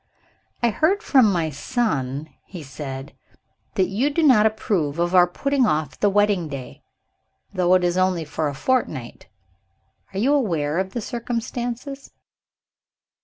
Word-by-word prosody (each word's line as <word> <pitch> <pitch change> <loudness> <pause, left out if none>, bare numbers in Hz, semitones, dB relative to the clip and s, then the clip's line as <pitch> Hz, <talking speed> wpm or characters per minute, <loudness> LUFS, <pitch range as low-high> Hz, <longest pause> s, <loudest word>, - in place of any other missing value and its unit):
"I 235 - +4
hear 315 - +2
from 265 - +4
my 165 -4 0
son," 145 - -2
he 175 -5 -9
said, 135 0 -7 0.6
"that 190 - +3
you 220 +10 0
do 320 +3 0
not 230 -7 +6
approve 185 -9 -1
of 175 +1 0
our 180 -1 +6
putting 275 +7 +1
off 150 -5 -1
the 205 - +3
wedding 205 -4 +2
day, 135 -3 -8 0.7
though 180 -1 +3
it 185 - +2
is 175 0 +1
only 185 -3 +1
for 150 +1 -2
a 140 - -4
fortnight. 150 - -2 0.8
Are 195 - -7
you 255 +8 +2
aware 170 - 0
of 190 0 -3
the 235 - -3
circumstances?" 245 +3 -4
190 Hz, 145 wpm, -23 LUFS, 155-240 Hz, 0.8 s, not